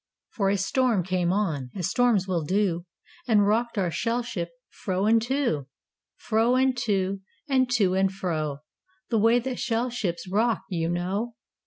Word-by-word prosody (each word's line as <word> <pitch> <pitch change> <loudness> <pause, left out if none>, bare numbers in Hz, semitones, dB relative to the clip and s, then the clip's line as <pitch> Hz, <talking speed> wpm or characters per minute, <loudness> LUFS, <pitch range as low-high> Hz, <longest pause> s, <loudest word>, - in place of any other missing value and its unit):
For 195 -3 0
a 200 - +2
storm 225 0 +1
came 180 -1 0
on 165 -10 -1
As 180 -4 -2
storms 235 -6 +2
will 175 -4 0
do 180 0 0 0.4
And 210 -4 +4
rocked 230 +2 +1
our 185 -4 +1
shell 230 +6 -1
ship 175 -8 -4 0.2
Fro 190 0 -2
and 225 +1 +4
to, 240 - -1 0.5
Fro 230 +1 +2
and 260 0 +3
to, 195 -2 0 0.3
And 260 -2 +2
to 200 -6 +3
and 190 0 +2
fro, 155 -7 -3 0.5
The 225 - +3
way 230 +3 +5
that 250 +1 -3
shell 240 +1 0
ships 180 -7 -3
Rock, 215 +3 +1
you 165 -2 -1
know. 195 +7 -2
200 Hz, 165 wpm, -26 LUFS, 180-235 Hz, 0.5 s, way